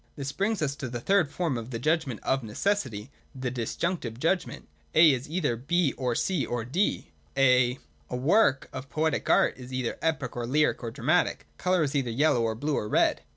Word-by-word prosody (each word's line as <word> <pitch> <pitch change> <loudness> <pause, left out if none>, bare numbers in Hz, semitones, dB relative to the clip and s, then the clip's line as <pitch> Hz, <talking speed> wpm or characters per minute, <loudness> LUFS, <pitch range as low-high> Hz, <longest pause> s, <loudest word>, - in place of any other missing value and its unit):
This 140 -1 -4
brings 200 +1 -1
us 140 -2 -1
to 130 - -5
the 120 0 -4
third 180 +3 +2
form 155 -5 -2
of 115 +1 -8
the 120 - -4
Judgment 150 -2 0
of 135 0 +1
Necessity, 120 - -2 0.2
the 130 -1 -3
Dis 120 -3 -4
junctive 170 -10 -2
judgment. 170 +4 -1 0.3
A 160 -1 +8
is 130 +1 -3
either 155 -7 0
B 155 +5 +1
ov 125 -3 -1
C 185 -7 0
or 120 -2 -3
D. 175 - -1 0.3
A 125 -2 +4 0.3
work 135 - +2
of 130 +1 -7
poetic 155 +1 -1
art - - +4
is 125 0 -10
either 130 -2 -3
epic 145 -6 -1
or 120 -1 -3
lyric 150 +4 +2
or 120 - -4
dramatic. 150 +10 0
Colour 180 -2 +2
is 140 -1 -2
either 135 -4 0
yellow 125 +1 +2
or 115 -1 0
blue 145 +5 -1
or 105 - -5
red. - - +2
135 Hz, 200 wpm, -27 LUFS, 120-160 Hz, 0.3 s, A